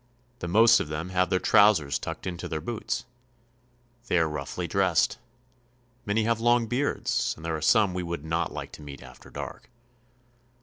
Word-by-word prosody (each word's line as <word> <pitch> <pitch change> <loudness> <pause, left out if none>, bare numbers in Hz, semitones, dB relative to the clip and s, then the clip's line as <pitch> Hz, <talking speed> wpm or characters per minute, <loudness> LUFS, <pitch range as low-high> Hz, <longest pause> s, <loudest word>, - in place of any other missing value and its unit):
The 85 - -4
most 110 +6 +6
of - - -3
them 75 +4 -4
have 90 -1 +1
their 95 - +2
trousers 95 -9 +4
tucked 80 0 -6
into 90 -2 -4
their 80 - -3
boots. 110 +7 -4 1.0
They 90 - +2
are 80 -1 +3
roughly 75 -3 -4
dressed. 105 +2 +2 0.9
Many 105 +2 +1
have 115 0 +1
long 120 0 +3
beards, 125 +5 -1
and 80 - -11
there 80 -1 -1
are 80 - -5
some 105 +2 +4
we 90 - -2
would 85 -3 -5
not 80 +1 -1
like - - -6
to - - -11
meet 70 -1 -10
after - - -14
dark. - - -8
90 Hz, 175 wpm, -27 LUFS, 80-110 Hz, 1.0 s, most